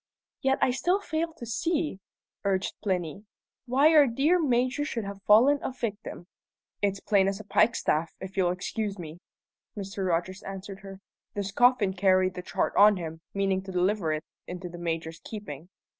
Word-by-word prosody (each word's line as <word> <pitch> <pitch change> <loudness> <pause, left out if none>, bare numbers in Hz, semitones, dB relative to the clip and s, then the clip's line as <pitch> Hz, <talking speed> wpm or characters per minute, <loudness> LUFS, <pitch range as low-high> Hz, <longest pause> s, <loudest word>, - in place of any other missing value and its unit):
"Yet 270 0 +2
I - - +4
still 355 +9 +1
fail 330 -4 -2
to 280 -7 -9
see," 300 - -1 0.4
urged 195 -1 0
Plinny, 185 -1 -2 0.4
"why 275 +6 +4
our 295 -3 +7
dear 285 +9 +2
Major 255 0 +1
should 235 -6 -3
have 200 0 -7
fallen 255 +8 +6
a - - -3
victim." 220 -7 -5 0.6
"It's 200 -1 0
plain 195 -2 +2
as 195 +1 -1
a - - -8
pikestaff, 170 -7 +2
if 190 0 -8
you'll 185 -2 +2
excuse 195 +3 -3
me," 165 -1 -8 0.6
Mr. 195 -1 -3
Rogers 180 +3 -1
answered 195 0 -7
her. 195 0 -11 0.3
"This 200 -1 -3
Coffin 245 -3 +4
carried 185 -1 +3
the 180 - -6
chart - - -1
on 205 0 +7
him, 160 -2 -6
meaning 195 -1 +1
to 190 0 -8
deliver 185 -2 +1
it 155 +1 -2 0.2
into 180 0 -6
the 175 0 -9
Major's 165 -1 -4
keeping. 180 -7 -8
195 Hz, 170 wpm, -28 LUFS, 185-240 Hz, 0.6 s, our